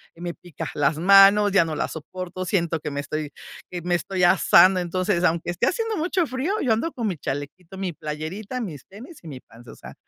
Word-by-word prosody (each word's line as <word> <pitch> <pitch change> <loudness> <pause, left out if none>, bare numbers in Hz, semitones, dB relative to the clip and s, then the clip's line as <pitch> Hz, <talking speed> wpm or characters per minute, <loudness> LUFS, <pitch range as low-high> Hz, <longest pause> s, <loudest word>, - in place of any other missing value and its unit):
me 175 0 -6
pica 175 -3 -8
las 145 +1 +1
manos, 200 +3 +6
ya 180 -4 +4
no 155 -1 -4
la - - -1
soporto, 185 +3 -7
siento 170 -4 0
que 150 - -5
me 140 0 -4
estoy 150 0 -5 0.4
que 175 -1 -6
me 175 0 -1
estoy 180 +1 -1
asando. 185 +1 +5
Entonces, 180 +1 -1
aunque 170 0 +1
esté 175 - 0
haciendo 450 0 -1
mucho 345 +2 0
frío, 265 +8 -3
yo 230 -4 +3
ando 310 +9 -2
con 235 -3 -4
mi 185 - -2
chalequito, 155 +8 -6
mi 185 -3 -3
playerita, 160 - -6
mis 160 - -7
tenis 250 - -12
y 165 - -13
mi 135 -4 -8
pants. 120 0 -18
O - - -11
sea, - - -12
180 Hz, 215 wpm, -23 LUFS, 160-205 Hz, 0.4 s, manos